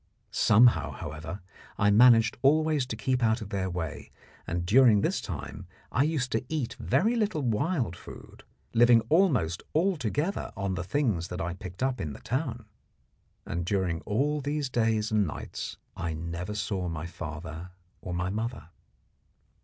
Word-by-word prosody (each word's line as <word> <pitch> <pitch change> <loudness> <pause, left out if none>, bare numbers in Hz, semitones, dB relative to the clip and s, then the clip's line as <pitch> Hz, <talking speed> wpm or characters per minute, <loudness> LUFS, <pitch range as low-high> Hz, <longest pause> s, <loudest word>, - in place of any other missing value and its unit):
Somehow, 105 - +4
however, 80 +8 -7 0.4
I 100 0 +3
managed 115 +1 +6
always 150 -1 +3
to - - -4
keep 130 -2 0
out 110 0 +2
of 110 -4 -7
their 95 -2 -2
way, 85 -4 -5 0.4
and 85 +1 -2
during 110 0 +6
this - - 0
time - - -7 0.2
I 125 - +2
used 145 -5 -1
to 110 - 0
eat 150 -7 -2
very 225 +6 +2
little 210 -10 0
wild 125 - 0
food, - - -12 0.3
living 120 0 +6
almost 130 - +3
altogether 160 - 0
on 100 -2 -1
the 90 -1 -3
things 100 - 0
that 90 0 -6
I 90 -1 -2
picked 90 +4 -7
up 130 -1 0
in 75 -3 -4
the - - -10
town. 125 -3 -3 0.8
And 85 +1 -3
during 90 -3 -1
all 145 +8 0
these 145 0 -2
days 110 -3 +1
and 105 -3 +2
nights - - -6 0.2
I 85 -1 -3
never 85 +5 -5
saw 100 -3 -2
my 80 0 -4
father 80 0 -7 0.3
or 90 - -6
my 90 +1 -1
mother. 110 -5 -4
110 Hz, 155 wpm, -28 LUFS, 90-130 Hz, 0.8 s, managed